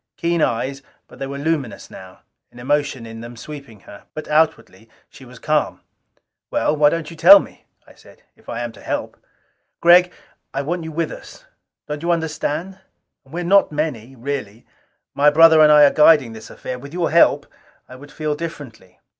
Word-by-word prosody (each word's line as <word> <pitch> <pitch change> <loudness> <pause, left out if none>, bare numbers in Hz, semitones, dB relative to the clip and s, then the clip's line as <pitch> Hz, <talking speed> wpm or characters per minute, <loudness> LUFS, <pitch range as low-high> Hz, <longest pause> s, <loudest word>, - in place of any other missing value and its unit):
Keen 170 -1 -1
eyes, 135 +2 -1 0.3
but - - -17
they 135 - -4
were 140 +1 -6
luminous 145 -5 -3
now - - -13 0.3
an - - -19
emotion 145 -1 -2
in 115 0 -10
them 120 0 -10
sweeping 140 -6 -11
her. 100 - -15
But 155 - -7
outwardly 150 -9 -1 0.2
she 135 - -15
was 125 0 -14
calm. 150 +4 -1 0.7
"Well, 150 - 0
why 145 -1 +4
don't 165 0 -4
you - - -10
tell 190 +5 +8
me?" - - -12 0.2
I - - -19
said. - - -20
"If - - -19
I 115 - -4
am 120 -1 -5
to - - -17
help...." - - -4 0.6
"Gregg, 180 +1 +5 0.4
I - - -2
want 170 +3 -4
you 160 - -7
with 160 0 -3
us. - - -12 0.4
Don't 150 0 -5
you 170 - -3
understand. 165 +2 -3 0.4
And 135 - -21
we 175 - -3
are - - -4
not 195 +1 +3
many, 135 -5 -4
really. 120 -4 -6 0.5
My 145 +1 +4
brother 160 +1 +6
and 150 0 +6
I 150 0 +7
are 145 - +6
guiding 150 -6 +4
this 110 0 -11
affair. 125 0 -7
With 140 +3 -12
your 175 -1 -1
help, 170 - +4 0.4
I 130 - -12
would 145 +3 -14
feel 150 0 -3
differently." 145 - -9
150 Hz, 190 wpm, -20 LUFS, 130-160 Hz, 0.7 s, tell